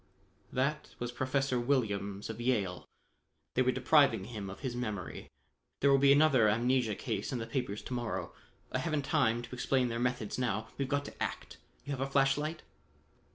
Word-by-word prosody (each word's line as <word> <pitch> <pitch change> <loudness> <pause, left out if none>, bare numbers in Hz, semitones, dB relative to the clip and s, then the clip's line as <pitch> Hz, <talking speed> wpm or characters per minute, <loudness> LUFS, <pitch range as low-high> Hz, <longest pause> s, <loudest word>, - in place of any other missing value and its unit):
"That 140 +4 -1
was 120 0 -3
Professor 130 0 0
Williams 105 -6 0
of 110 +1 -7
Yale. 105 -8 0 0.7
They 130 - +2
were 130 0 +3
depriving 140 +3 +4
him 105 -5 -6
of 95 - -9
his 130 -3 -3
memory. 105 -7 -4 0.5
There 140 - +4
will 135 - +6
be 140 0 +6
another 140 -6 +5
amnesia 120 0 +2
case 100 - -3
in 130 - -1
the 115 - -3
papers 120 -6 -3
to - - -6
morrow. 120 -3 -3 0.4
I - - 0
haven't 155 -4 -1
time 120 -7 +2
to 120 - -10
explain 125 0 +1
their 115 0 -2
methods 125 -2 -1
now: 110 -3 -1
we've 135 -1 -1
got 145 0 0
to - - -11
act. - - -4 0.3
You 145 - -5
have 135 -2 -3
a 135 - -1
flash 135 0 +4
light?" 155 +2 -4
125 Hz, 185 wpm, -32 LUFS, 115-135 Hz, 0.7 s, will